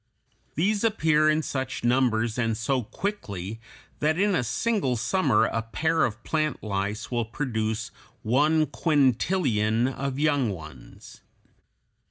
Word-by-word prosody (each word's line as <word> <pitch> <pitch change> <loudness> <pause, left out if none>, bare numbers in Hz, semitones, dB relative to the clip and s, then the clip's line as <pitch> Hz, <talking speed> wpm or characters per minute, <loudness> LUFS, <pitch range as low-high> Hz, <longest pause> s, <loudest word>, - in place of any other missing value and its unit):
These 200 +6 +1
appear 155 -8 +3
in 155 +1 +2
such 130 -3 -4
numbers 120 -2 +1
and 115 -2 0
so 130 +3 0
quickly 110 - -5 0.4
that 155 +2 +1
in 200 +1 +2
a 165 - +1
single 135 - 0
summer 120 - +2
a 115 - -1
pair 160 +8 +1
of 115 0 -5
plant 155 -4 -1
lice 105 +1 -3
will 120 -2 0
produce 110 -2 -3 0.3
one 150 +7 +3
quintillion 130 - +1
of 135 0 -3
young 145 -5 +2
ones. 75 -10 -10
130 Hz, 125 wpm, -26 LUFS, 110-155 Hz, 0.4 s, appear